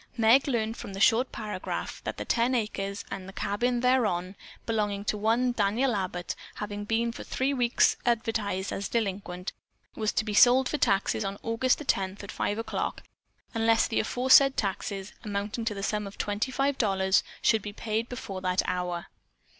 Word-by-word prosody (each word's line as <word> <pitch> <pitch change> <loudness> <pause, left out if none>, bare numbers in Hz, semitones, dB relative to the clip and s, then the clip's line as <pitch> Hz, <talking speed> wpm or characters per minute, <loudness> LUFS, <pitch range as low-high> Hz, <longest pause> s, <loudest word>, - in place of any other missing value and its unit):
Meg 230 +5 +5
learned 225 -4 0
from 200 - -8
the 195 - -6
short 230 +5 +4
paragraph 210 -4 -5
that - - -3
the - - -4
ten 240 +2 +2
acres 200 -3 -2
and 195 0 -7
"cabin 240 +4 0
thereon" 210 -8 +1 0.3
belonging 205 -3 -1
to 210 - 0
one 225 +4 +2
Daniel 230 +3 +1
Abbott, 180 -2 -3 0.2
having 205 0 -5
been 230 +2 +1
for - - -8
three 270 +2 -1
weeks 245 -3 +3
advertised 220 -5 -1
as 200 - -3
delinquent, 195 -4 -2 0.4
was 215 -1 0
to 220 - 0
be 210 - -3
sold 255 +4 +6
for 300 - -2
taxes 195 +2 +2
on 195 0 -3
August 230 +3 +2
the 300 - -8
tenth 195 -3 -1
at 200 - -7
five 205 - -1
o'clock 225 - -3 0.5
unless 225 0 +3
the 225 - 0
aforesaid 260 +4 +5
taxes, 195 0 -3
amounting 205 +2 -3
to 215 -2 -1
the 195 - -5
sum 210 0 -1
of 200 - -11
twenty 205 +5 -1
five 275 +1 0
dollars, 190 -3 +3 0.2
should 220 -2 +4
be 205 - -6
paid 220 +2 -2
before 195 -6 -6
that 185 0 +1
hour. 180 -1 -2
215 Hz, 175 wpm, -28 LUFS, 195-235 Hz, 0.5 s, sold